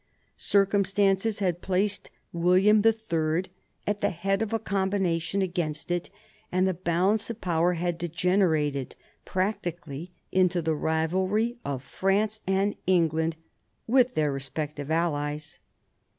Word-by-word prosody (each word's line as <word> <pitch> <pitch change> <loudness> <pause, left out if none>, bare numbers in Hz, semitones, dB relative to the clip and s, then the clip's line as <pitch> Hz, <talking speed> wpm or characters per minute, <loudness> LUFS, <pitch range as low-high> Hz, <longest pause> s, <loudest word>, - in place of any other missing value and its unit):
Circumstances 200 +1 +2
had 180 -4 -1
placed 195 +2 -1 0.2
William 185 +5 +4
IIL 185 -7 +1 0.4
at 210 0 -1
the - - +2
head 195 +3 -1
of 220 - -1
a 225 - +2
combination 190 -2 0
against 175 -3 -3
it, 175 0 -1 0.4
and 185 +1 +2
the 190 - +1
balance 185 +5 +1
of 230 -1 -5
power 175 -1 +1
had 175 0 -2
degenerated 165 -5 +1 0.3
practically 175 -5 -3 0.2
into 185 -1 +3
the 160 -1 0
rivalry 185 +10 0
of 135 -2 -3
France 205 +7 0
and 195 +2 +2
England, 165 -3 +2 0.5
with 250 +1 +3
their 150 -2 +2
respective 145 +2 -5
allies. 150 -2 -1
180 Hz, 120 wpm, -27 LUFS, 160-200 Hz, 0.5 s, William